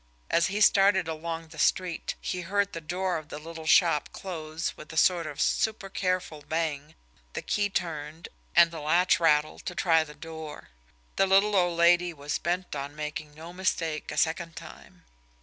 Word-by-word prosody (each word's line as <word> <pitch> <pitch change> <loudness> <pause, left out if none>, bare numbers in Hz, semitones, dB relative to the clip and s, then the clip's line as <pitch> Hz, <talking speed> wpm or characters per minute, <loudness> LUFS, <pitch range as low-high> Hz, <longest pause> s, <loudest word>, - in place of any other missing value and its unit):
As 170 - +3
he 205 +2 -2
started 195 -3 +5
along 165 0 -5
the 160 -1 -12
street, 180 0 0
he 180 - -3
heard 200 +3 0
the 165 - -5
door 180 +2 -2
of 155 0 -15
the 145 - -6
little 160 +1 -9
shop 165 -3 +4
close 160 -3 -5
with 155 - -11
a 160 - -7
sort 170 -1 +3
of 145 -2 -7
supercareful 185 -6 -1
bang, 155 -2 -2 0.4
the - - -4
key 205 -1 0
turned, 160 -3 -4 0.3
and 170 -1 +7
the 165 - -7
latch 170 +5 +3
rattle 155 -2 +2
to 180 - -6
try 165 -3 +3
the 150 -1 -12
door 160 -1 -9 0.5
the 195 - +4
little 200 +2 +4
old 175 -3 +2
lady 175 +1 +4
was 145 0 -3
bent 175 0 -2
on 140 +1 -5
making 150 0 -6
no 165 +3 -10
mistake 165 -4 -2
a - - -6
second 165 +1 0
time! - - -12
165 Hz, 175 wpm, -28 LUFS, 155-180 Hz, 0.5 s, and